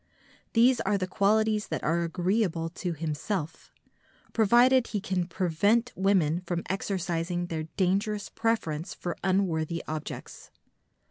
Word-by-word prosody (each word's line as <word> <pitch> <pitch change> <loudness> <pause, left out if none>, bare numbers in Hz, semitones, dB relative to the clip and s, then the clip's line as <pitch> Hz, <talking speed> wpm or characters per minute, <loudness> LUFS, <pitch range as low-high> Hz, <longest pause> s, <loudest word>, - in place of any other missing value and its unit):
These 240 +2 +5
are 200 +1 +1
the 185 - -1
qualities 210 +2 +2
that - - -3
are 170 +2 +1
agreeable 175 0 0
to 175 0 -4
himself, 160 +2 -4 0.6
provided 240 +3 +5
he 210 - -2
can 185 -3 -2
prevent 200 +7 +1
women 180 -4 +2
from 175 -1 -3
exercising 175 -3 -2
their 160 -2 -4
dangerous 200 +2 +1
preference 165 -9 -2
for 175 - -4
unworthy 170 -4 0
objects. 155 -1 -6
185 Hz, 120 wpm, -28 LUFS, 165-210 Hz, 0.6 s, These